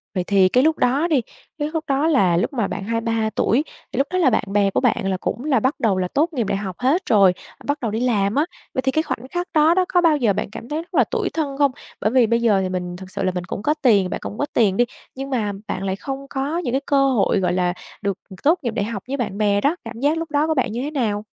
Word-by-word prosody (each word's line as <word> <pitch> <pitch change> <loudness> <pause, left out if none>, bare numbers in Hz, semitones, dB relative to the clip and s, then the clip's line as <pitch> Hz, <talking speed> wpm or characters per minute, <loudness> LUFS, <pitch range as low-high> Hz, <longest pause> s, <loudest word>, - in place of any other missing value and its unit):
Vậy 180 - 0
thì 190 -1 +4
cái 255 +5 +3
lúc 320 +1 +3
đó 275 +7 +2
đi, 300 -7 +2 0.4
cái 295 -1 -2
lúc 320 - -1
đó 280 +3 +1
là 190 - +3
lúc 185 - 0
mà 225 -6 0
bạn 200 - -5
23 230 0 -1
tuổi 255 +7 +2 0.3
thì - - -6
lúc 275 - +2
đó 370 - 0
là 315 -7 +5
bạn 220 - +1
bè 200 -1 +3
của - - 0
bạn - - +1
là 190 - 0
cũng 220 +6 -4
là 275 -5 +3
bắt 260 +6 0
đầu 205 -5 +2
là 185 - 0
tốt 315 - 0
nghiệp 240 -7 -1
đại - - 0
học 195 -3 -5
hết 275 +9 +2
rồi, 195 -4 +6 0.3
bắt 285 +1 -1
đầu 230 -4 -1
đi 220 - -2
làm 215 -4 +1
á. 295 - +3 0.3
Vậy 260 - 0
thì 265 - +1
cái 315 +3 +1
khoảnh 260 -5 -4
khắc 350 +1 -2
đó 310 +2 +5
đó, 370 0 +2
có 355 - +3
bao 325 -3 +4
giờ 230 -7 +2
bạn 195 - -3
cảm 230 - -9
thấy 305 +2 -2
rất 340 - -17
là - - +5
tủi 425 -5 -2
thân 285 -4 -3
không? 285 -1 +3 0.3
Bởi 215 - +1
vì 250 -3 +4
bây 235 +1 +1
giờ 210 -5 +3
thì 185 - -2
mình 180 -1 -4
thực 185 +1 -10
sự - - -3
là 185 - +1
mình 180 - -2
cũng 195 - -5
có 300 - +3
tiền, 205 -7 +4
bạn - - -3
cũng 210 - -6
có 290 - 0
tiền 200 -5 +3
đi, 245 - +4 0.3
nhưng 270 +1 -5
mà 225 -6 0 0.2
bạn 190 - -3
lại 190 -1 -1
không 275 +6 -6
có 280 +4 -2
những 260 -9 -2
cái 270 - +1
cơ 275 -1 +3
hội, 230 -7 +2
gọi 180 -2 +1
là, 180 -1 +1 0.3
được 200 -2 -1 0.3
tốt 330 +5 +4
nghiệp 235 - -1
đại 200 - -1
học 210 -4 -5
với 275 +2 -2
bạn 215 -6 -3
bè 205 -1 +2
đó, 295 +4 +2
cảm 230 0 -7
giác 295 +4 +2
lúc 325 -1 -4
đó 295 +2 +2
của 315 - +2
bạn 260 -7 0
như 235 +3 -3
thế 290 +3 -3
nào? 215 -8 -1
245 Hz, 300 wpm, -21 LUFS, 200-290 Hz, 0.4 s, rồi